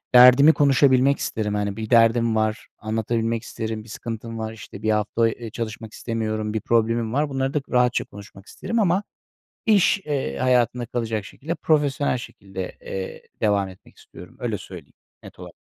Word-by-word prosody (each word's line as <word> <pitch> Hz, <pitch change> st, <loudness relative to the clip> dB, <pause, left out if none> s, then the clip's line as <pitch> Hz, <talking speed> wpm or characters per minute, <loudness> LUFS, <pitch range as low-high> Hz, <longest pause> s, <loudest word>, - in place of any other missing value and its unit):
Derdimi 125 Hz, +5 st, +9 dB
konuşabilmek 140 Hz, -1 st, +4 dB
isterim. 105 Hz, -2 st, -2 dB
Hani, 100 Hz, -1 st, -2 dB
bir 110 Hz, -1 st, -5 dB
derdim 115 Hz, -1 st, +4 dB
var, 110 Hz, 0 st, -1 dB
anlatabilmek 115 Hz, +1 st, -1 dB
isterim; 110 Hz, -2 st, -5 dB
bir 115 Hz, -, -16 dB
sıkıntım 115 Hz, 0 st, -6 dB
var, 110 Hz, 0 st, -4 dB
işte, 100 Hz, -1 st, -11 dB
1 110 Hz, -, +2 dB
hafta, 110 Hz, +2 st, +1 dB
eee, 115 Hz, 0 st, -7 dB
çalışmak 110 Hz, -1 st, -6 dB
istemiyorum; 110 Hz, -2 st, -3 dB
bir 110 Hz, -, -1 dB
problemim 115 Hz, 0 st, +1 dB
var, 145 Hz, +2 st, +1 dB
bunları 135 Hz, 0 st, -1 dB
da 150 Hz, -, 0 dB
rahatça 125 Hz, -1 st, +2 dB
konuşmak 100 Hz, -1 st, -13 dB
isterim 230 Hz, 0 st, -3 dB
ama 190 Hz, 0 st, +2 dB, 0.6 s
iş, 205 Hz, -2 st, +4 dB
eee, 135 Hz, -, -2 dB
hayatında 125 Hz, -1 st, +2 dB
kalacak 115 Hz, -3 st, -3 dB
şekilde, 160 Hz, -, -5 dB
profesyonel 145 Hz, -5 st, +1 dB
şekilde, 95 Hz, -5 st, -8 dB
eee, 95 Hz, -1 st, -6 dB, 0.2 s
devam 100 Hz, -2 st, +2 dB
etmek 95 Hz, -, -17 dB
istiyorum. 85 Hz, +1 st, -14 dB
Öyle 115 Hz, -4 st, -2 dB
söyleyeyim 90 Hz, -7 st, -11 dB, 0.3 s
net -, -, -13 dB
olarak. -, -, -10 dB
115 Hz, 160 wpm, -23 LUFS, 110-125 Hz, 0.6 s, Derdimi